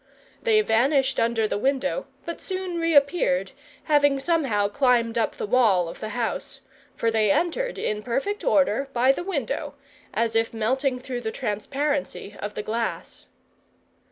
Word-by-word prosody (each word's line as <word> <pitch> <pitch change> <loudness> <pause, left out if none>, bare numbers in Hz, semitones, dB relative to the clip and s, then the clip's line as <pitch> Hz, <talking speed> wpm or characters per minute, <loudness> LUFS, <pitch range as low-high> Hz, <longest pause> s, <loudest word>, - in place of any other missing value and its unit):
They 440 -3 +4
vanished 265 - +2
under 230 -1 +1
the 205 - -2
window, 275 - 0 0.2
but 335 - -6
soon 370 -2 -3
reappeared, 330 - +2 0.3
having 285 -2 +3
somehow 270 -10 +1
climbed 240 -1 +2
up 230 -1 0
the - - -3
wall 205 -6 +3
of 165 - -8
the 215 - -5
house; 230 -2 -3 0.3
for 230 - 0
they 215 -2 +2
entered 355 - 0
in 210 0 -2
perfect 275 - -2
order 275 - +2
by 250 +2 +4
the 310 - -3
window, 290 - -3 0.4
as 230 0 0
if 225 0 +1
melting 260 +4 0
through 250 -1 -5
the 220 -2 -3
transparency 270 +1 -3
of 205 +1 -5
the 210 - -3
glass. 225 +2 -4
265 Hz, 150 wpm, -25 LUFS, 225-295 Hz, 0.4 s, They